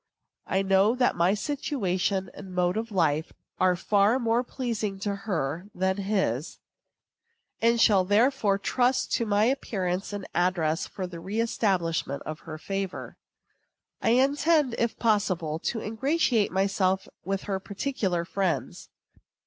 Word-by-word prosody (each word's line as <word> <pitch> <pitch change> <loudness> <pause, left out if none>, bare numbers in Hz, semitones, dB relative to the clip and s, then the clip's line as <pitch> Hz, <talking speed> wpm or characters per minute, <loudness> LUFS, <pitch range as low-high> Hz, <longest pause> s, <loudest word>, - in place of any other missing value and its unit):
I 195 - +1
know 195 +4 +3
that 250 -1 +2
my 175 +4 +3
situation 200 - -1
and 190 -2 -10
mode 180 0 +1
of 225 +1 -3
life 160 -5 +1 0.3
are 185 -1 +4
far 205 +5 +3
more 235 -1 +1
pleasing 230 -6 -3
to 205 0 -1
her 180 -4 -3
than 190 +1 0
his, 190 - -1 1.0
and 230 +1 +3
shall 205 -4 +5
therefore 205 0 +3
trust 250 +5 +1
to 230 - +1
my 205 0 +3
appearance 195 -8 -1
and 205 -2 -5
address 175 -2 +1
for 190 - -7
a - - -2
reëstablishment 180 -5 -1
in 155 - -4
her 155 0 -9
favor. 195 +3 -4 0.9
I - - +2
intend, 285 +1 +3
if 235 -1 0
possible, 185 -8 0
to 225 +5 -2
ingratiate 240 -1 +1
myself 190 0 +1 0.2
with 195 +1 -2
her 195 -2 -2
particular 195 -4 -2
friends. 190 -1 -2
195 Hz, 135 wpm, -27 LUFS, 180-230 Hz, 1.0 s, shall